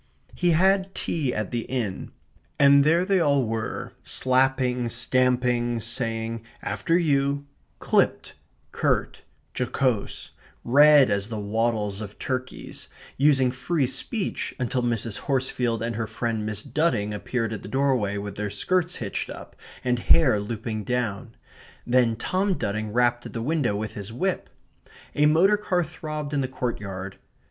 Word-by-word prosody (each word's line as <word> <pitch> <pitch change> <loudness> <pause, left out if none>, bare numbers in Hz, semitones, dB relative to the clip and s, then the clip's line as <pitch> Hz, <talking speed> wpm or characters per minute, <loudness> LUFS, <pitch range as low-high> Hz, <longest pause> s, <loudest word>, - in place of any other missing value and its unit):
He 175 - +1
had 190 +3 +2
tea 150 -6 -1
at 105 -4 -3
the 120 - -1
Inn; 115 -8 -3 0.5
and 140 0 +6
there 165 +4 +3
they 195 -1 +2
all 140 -5 +3
were, 115 0 -4
slapping, 130 -2 +1
stamping, 120 0 +1
saying, 115 0 -2 0.2
"After 105 +12 0
you," 140 -3 +1 0.3
clipped, - - +1 0.4
curt, - - 0 0.3
jocose, 125 -3 -1 0.3
red 145 +1 +6
as 100 +1 -1
the 110 -2 -4
wattles 105 -1 -1
of 105 -1 -8
turkeys, 130 -1 -5 0.3
using 135 -3 +3
free 135 +3 0
speech 190 - -3
until 125 0 0
Mrs. 115 -3 -1
Horsefield 125 -4 -1
and 115 -1 -2
her 115 -1 -2
friend 110 -1 -2
Miss 105 -1 -3
Dudding 115 -10 0
appeared 115 +2 -2
at 110 - -5
the - - -9
doorway 130 -6 +1
with 100 0 -5
their 105 0 -2
skirts 180 - 0
hitched 100 -4 -4
up, - - -10 0.3
and 125 -1 +1
hair 130 -6 +4
looping 110 +1 -4
down. 115 -1 -2 0.5
Then 120 -2 +3
Tom 185 - 0
Dudding 110 -2 -3
rapped 120 +1 +1
at - - -12
the 115 - -3
window 140 -6 0
with 110 +1 -4
his 100 0 -7
whip. 185 +10 -2 0.6
A 150 +1 +4
motor 180 +7 +4
car 185 -4 0
throbbed 155 -2 -6
in 140 - +1
the 130 - -1
courtyard. 100 -7 -5
125 Hz, 145 wpm, -25 LUFS, 110-140 Hz, 0.6 s, and